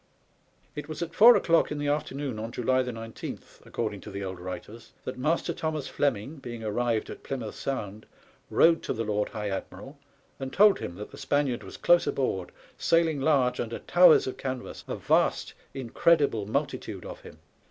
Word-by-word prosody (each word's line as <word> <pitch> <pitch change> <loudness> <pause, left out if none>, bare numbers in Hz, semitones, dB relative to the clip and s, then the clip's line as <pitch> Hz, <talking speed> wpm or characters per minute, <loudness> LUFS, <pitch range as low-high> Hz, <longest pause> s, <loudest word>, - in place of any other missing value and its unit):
It 150 0 -6
was 155 +2 -3
at 170 0 -7
four 235 +6 +9
o'clock 170 -1 +3
in 150 - -2
the 145 0 -2
afternoon 140 -4 -2
on 115 +2 -5
July 130 +2 +1
19, 115 -3 -6 0.3
according 105 -4 -3
to - - -9
the 100 0 -5
old 95 -2 -5
writers, 90 +6 -8
that 130 - -5
Master 150 +6 0
Thomas 155 -3 -3
Fleming, 140 +2 -1
being 120 -4 -7
arrived 115 +1 -1
at - - -9
Plymouth 125 -6 -5
Sound, 110 -6 -5 0.4
rowed 165 0 +5
to - - -2
the 115 - -2
Lord 105 -1 -1
High 105 -2 -4
Admiral 95 - -7 0.4
and 135 -1 -5
told 205 +5 +5
him 85 - -5
that 105 - -8
the - - -11
Spaniard 140 -5 0
was 95 - -10
close 175 0 +4
aboard, 95 -9 -1 0.3
sailing 165 -4 +2
large 135 -4 +2
under 115 -1 -3
towers 175 -2 +6
of 130 - -4
canvas, 130 -2 -5
a - - -3
vast, - - +1 0.2
incredible 135 -3 +2
multitude 130 -6 -3
of - - -8
him. - - -13
130 Hz, 175 wpm, -28 LUFS, 110-150 Hz, 0.4 s, four